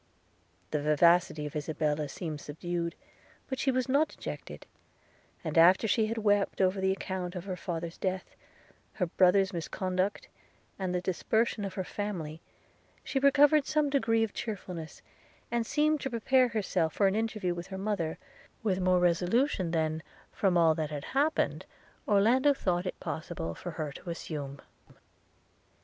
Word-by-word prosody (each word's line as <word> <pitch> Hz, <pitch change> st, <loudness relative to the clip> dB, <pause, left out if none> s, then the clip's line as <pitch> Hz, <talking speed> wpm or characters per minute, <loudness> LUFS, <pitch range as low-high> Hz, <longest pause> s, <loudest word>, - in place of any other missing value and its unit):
The 150 Hz, -, 0 dB
vivacity 155 Hz, +1 st, +3 dB
of 150 Hz, -, -7 dB
Isabella 150 Hz, 0 st, -1 dB
seemed 155 Hz, -1 st, -5 dB
subdued, 170 Hz, +2 st, -4 dB, 0.5 s
but 265 Hz, -1 st, -4 dB
she 270 Hz, -, +1 dB
was 255 Hz, 0 st, +1 dB
not 285 Hz, +4 st, +3 dB
dejected; -, -, -8 dB, 0.8 s
and 160 Hz, -1 st, +1 dB
after 185 Hz, +6 st, +6 dB
she 220 Hz, 0 st, +2 dB
had 225 Hz, +1 st, -3 dB
wept 205 Hz, -2 st, +1 dB
over 190 Hz, 0 st, +2 dB
the 190 Hz, 0 st, +2 dB
account 190 Hz, -1 st, -4 dB
of 180 Hz, 0 st, -5 dB
her 190 Hz, -2 st, -3 dB
father's 170 Hz, -2 st, -5 dB
death, 185 Hz, -1 st, -3 dB, 0.6 s
her 185 Hz, -, 0 dB
brother's 190 Hz, +3 st, +3 dB
misconduct, 185 Hz, +3 st, -2 dB, 0.5 s
and 185 Hz, -2 st, -1 dB
the 180 Hz, -, 0 dB
dispersion 220 Hz, +4 st, 0 dB
of 195 Hz, -, -4 dB
her 190 Hz, -, -2 dB
family, 175 Hz, -6 st, -5 dB, 0.6 s
she 270 Hz, -, -1 dB
recovered 280 Hz, +1 st, +5 dB
some 300 Hz, -2 st, +1 dB
degree 225 Hz, -5 st, +2 dB
of 220 Hz, -, -2 dB
cheerfulness, 180 Hz, -7 st, -6 dB, 0.5 s
and 235 Hz, -1 st, 0 dB
seemed 305 Hz, -1 st, +2 dB
to 270 Hz, -, -2 dB
prepare 255 Hz, +2 st, +3 dB
herself 190 Hz, -8 st, 0 dB
for 200 Hz, -, +2 dB
an 195 Hz, -, +3 dB
interview 215 Hz, -5 st, -1 dB
with 175 Hz, 0 st, -7 dB
her 190 Hz, -1 st, -6 dB
mother, 190 Hz, -5 st, -2 dB, 0.5 s
with 190 Hz, -4 st, +1 dB
more 185 Hz, 0 st, +3 dB
resolution 180 Hz, -, +2 dB
than, 160 Hz, -1 st, 0 dB, 0.3 s
from 190 Hz, -3 st, +2 dB
all 165 Hz, -2 st, +5 dB
that 155 Hz, -1 st, -2 dB
had 145 Hz, -2 st, -5 dB
happened, 290 Hz, +4 st, +1 dB, 0.4 s
Orlando 245 Hz, +8 st, +4 dB
thought 180 Hz, -5 st, -1 dB
it -, -, -5 dB
possible 85 Hz, -, -4 dB
for 175 Hz, -, -7 dB
her 155 Hz, -2 st, -3 dB
to 155 Hz, -, -9 dB
assume. 145 Hz, -4 st, -5 dB
185 Hz, 155 wpm, -30 LUFS, 165-220 Hz, 0.8 s, after